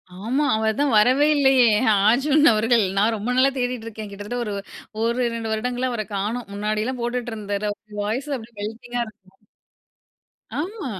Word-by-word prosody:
ஆமா. 235 +10 -1
அவர் 220 0 0
தான் 290 -2 +2
வரவே 255 +7 +5
இல்லையே! 265 -3 +5 0.4
அர்ஜுன் 285 +5 +3
அவர்கள். 225 +1 +3
நான் 215 +3 +3
ரொம்ப 215 +3 -4
நாளா 270 +1 +5
தேடிக்ருக்கேன். 230 -4 -4
கிட்டத்தட்ட 205 +4 -6
ஒரு 210 - -3 0.5
1,2 230 -1 -1
வருடங்களா, 250 +3 -1
அவர 215 -3 -3
காணோம். 215 +3 -3
முன்னாடி 210 +1 -1
எல்லாம் 255 +1 -3
போட்டுட்டு 240 0 -3
இருந்தாரு. 205 -1 -3
அவரு 210 0 -11
வாய்ஸ் 245 +8 -3
அப்டியே 225 -1 -14
வெல்தியா 240 +3 -4
இருக்கும். 195 -3 -17 1.2
ஆமா. 345 - -4
230 Hz, 145 wpm, -23 LUFS, 215-250 Hz, 1.2 s, வரவே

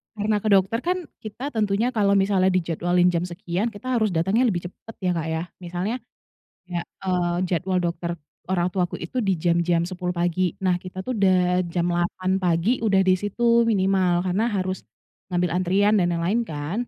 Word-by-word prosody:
karena 210 0 0
ke 215 - -1
dokter 195 +3 +3
kan 360 +1 -1 0.2
kita 245 +7 -6
tentunya 215 +2 +1
kalau 200 -4 +2
misalnya 195 -1 +3
dijadwalin 175 0 +2
jam 175 0 -1
sekian, 180 +3 -3
kita 245 +4 -5
harus 215 -1 +2
datangnya 195 +10 +2
lebih 180 -5 -1
cepat 225 - -14
ya, 180 - +2
Kak, 165 -2 -2
ya? 160 0 -2 0.2
Misalnya, 180 +6 -3 0.7
kayak, 175 -1 -3
eee, 180 -2 -2
jadwal 180 +1 0
dokter 170 0 -2 0.3
orang 180 -1 0
tuaku 180 -1 -1
itu 175 +10 -4
di 195 -5 +1
jam-jam 170 0 +1
10.00 180 0 -4
pagi. 175 0 0
Nah, 180 -1 +2
kita 185 +1 -7
tuh 255 - -3
udah 180 -2 +3
jam 170 0 -1
8.00 185 +2 0
pagi 180 +6 +1
udah 200 -4 +3
di 185 -1 +3
situ 235 +3 +2
minimal, 190 -4 +2
karena 190 +5 +1
harus 190 -4 -3 0.4
ngambil 180 -2 0
antrian 195 +4 +2
dan 175 - +2
yang 170 - -2
lain, 210 +7 +1
kan. 160 +11 -3
185 Hz, 180 wpm, -24 LUFS, 175-205 Hz, 0.7 s, dokter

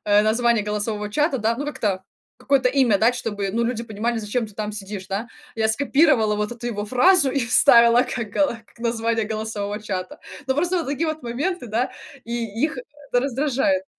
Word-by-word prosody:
э, 205 0 +4
название 230 0 +2
голосового 210 0 -3
чата, 295 +2 +1
да, 225 +1 0
ну, 290 +2 -4
как-то 195 -9 -2 0.3
какое-то 270 -3 +2
имя 250 -7 +3
дать, 235 +3 +3
чтобы, 205 -5 -3
ну, 235 +1 0
люди 235 -1 -2
понимали, 225 +2 -2
зачем 220 +2 -2
ты 210 - -16
там 215 0 -4
сидишь, 200 -2 -7
да". 205 +5 -3 0.3
Я 220 0 +1
скопировала 270 -3 +3
вот 210 +2 -2
эту 240 0 -7
его 205 -3 -3
фразу 275 - +4
и 280 - 0
вставила 235 0 +6
как 230 -4 -4
гала 260 -1 0
как - - -25
название 230 -1 0
голосового 215 -1 -4
чата. 185 -3 -5 0.3
Но 265 - +1
просто 350 +5 0
вот 330 - -3
такие 290 +4 -1
вот 310 0 -4
моменты, 260 +5 -3
да, 230 +4 0 0.3
и 235 0 -3 0.2
их 310 -4 -2
это 275 -1 -3
раздражает. 280 +2 0
235 Hz, 190 wpm, -22 LUFS, 210-270 Hz, 0.3 s, вставила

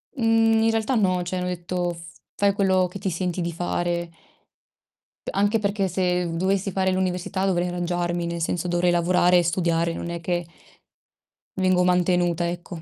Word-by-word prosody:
Mhmm, 225 -2 +3
in 225 - +3
realtà 225 +3 0
no, 185 -5 +2
cioè, 180 +1 -3
hanno 180 - -2
detto: 175 0 -2
"F 165 0 -13 0.2
fai 200 -1 +2
quello 190 -2 +2
che 185 +2 -9
ti 195 - -2
senti 180 0 -2
di 170 0 -2
fare." 175 0 -2 1.2
Anche 205 +3 +2
perché 200 -2 0
se 180 0 0
v 165 - -4
dovessi 195 +2 0
fare 190 0 +1
l'università 185 +1 -1
dovrei 180 -2 +1
arrangiarmi, 175 0 -2
nel 170 0 -4
senso 175 +2 -1
dovrei 175 0 +2
lavorare 175 +1 +3
e 175 - +3
studiare, 170 -1 0
non 170 - -5
è 170 - -4
che 175 0 -2 1.1
vengo 185 -1 +2
mantenuta, 175 -1 +2
ecco. 175 -1 -7
180 Hz, 170 wpm, -24 LUFS, 175-190 Hz, 1.2 s, Mhmm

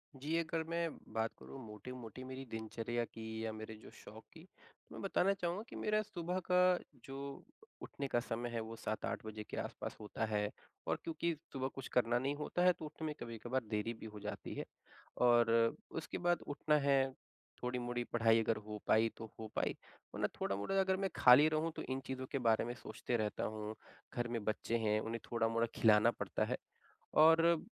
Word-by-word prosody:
जी, 150 +5 -1
अगर 165 -1 0
मैं 170 0 0 0.2
बात 110 0 +1
करूँ 135 - -9
मोटी-मोटी 120 +3 -8
मेरी 130 +1 -6
दिनचर्या 115 +1 -2
की 110 0 -5
या 110 - -1
मेरे 110 0 -7
जो - - -10
शौक - - -11
की - - -13 0.5
मैं - - -7
बताना 195 +2 +3
चाहूँगा 180 +1 -2
कि - - -9
मेरा 215 0 +2
सुबह 180 -3 -3
का 180 0 +6 0.3
जो 135 0 -6 0.6
उठने 140 - -4
का 120 - +2
समय 120 0 -3
है 115 - -2
वो 110 +1 -6
7-8 110 0 -3
बजे 110 0 -5
के - - -5
आस-पास - - -4
होता 105 +1 -2
है। 105 -1 0 0.4
और - - +2
क्योंकि 165 +1 0 0.2
सुबह 130 -1 -1
कुछ 135 - -5
करना 120 0 +4
नहीं 135 +3 0
होता 150 +4 -1
है 180 0 +7
तो 160 - -8
उठने 155 +1 -6
में 150 - -2
कभी-कभार 120 +3 -2
देरी 110 +2 0
भी 110 - -10
हो 105 -1 -8
जाती 105 +1 -5
है। - - -3 0.6
और 120 -2 +6 0.4
उसके 165 - -4
बाद 175 0 +2
उठना 150 +1 +2
है, 135 -1 +3 0.5
थोड़ी-मोड़ी 120 -1 -1
पढ़ाई 115 -1 +5
अगर 115 0 +1
हो 105 -1 -5
पाई 110 +1 +5
तो 115 - -6
हो 110 - -4
पाई, - - +1 0.4
वरना - - +1
थोड़ा-मोड़ा 100 - +1
अगर 190 0 +2
मैं 195 0 0
खाली 130 +5 +8
रहूँ 155 +1 +1
तो - - -4
इन 130 0 0
चीज़ों 130 0 -3
के 135 - 0
बारे 110 - +4
में 120 - -3
सोचते 115 +1 -3
रहता 105 -1 -1
हूँ। 105 0 -4 0.4
घर 120 0 0
में 115 -3 -2
बच्चे 110 +2 0
हैं 110 -1 +2
उन्हें 115 +1 -3
थोड़ा-मोड़ा 115 0 +2
खिलाना 110 +1 +6
पड़ता - - -2
है - - -1 0.7
और 165 +1 +6
120 Hz, 190 wpm, -37 LUFS, 110-155 Hz, 0.7 s, खाली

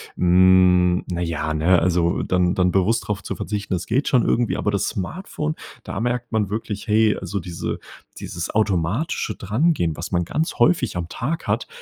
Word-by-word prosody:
hm, 90 0 +4
na 85 - -2
ja, 80 -2 -2
ne 85 +4 +3
also 85 +1 +1
dann 90 0 +1
dann 90 -1 +2
bewusst 100 +5 +1
drauf 100 -2 -2
zu 95 - -5
verzichten, 100 -2 -3
das 90 - -4
geht 130 +6 0
schon 125 -3 +3
irgendwie, 120 -1 +1
aber 105 - 0
das 100 -3 0
Smartphone 155 - -4 0.3
da - - -5
merkt 120 0 -2
man 105 -3 0
wirklich, 105 0 -4
hey, 110 0 +3
also 95 +2 -4
diese 85 -1 -4 0.4
dieses 85 0 -5
automatische 105 - 0
Drangehen, 110 - 0
was 85 +5 -6
man 85 -1 +1
ganz 155 - -2
häufig 125 - +2
am 85 -1 -3
Tag 150 - -4
hat, - - 0
95 Hz, 180 wpm, -22 LUFS, 90-115 Hz, 0.4 s, hm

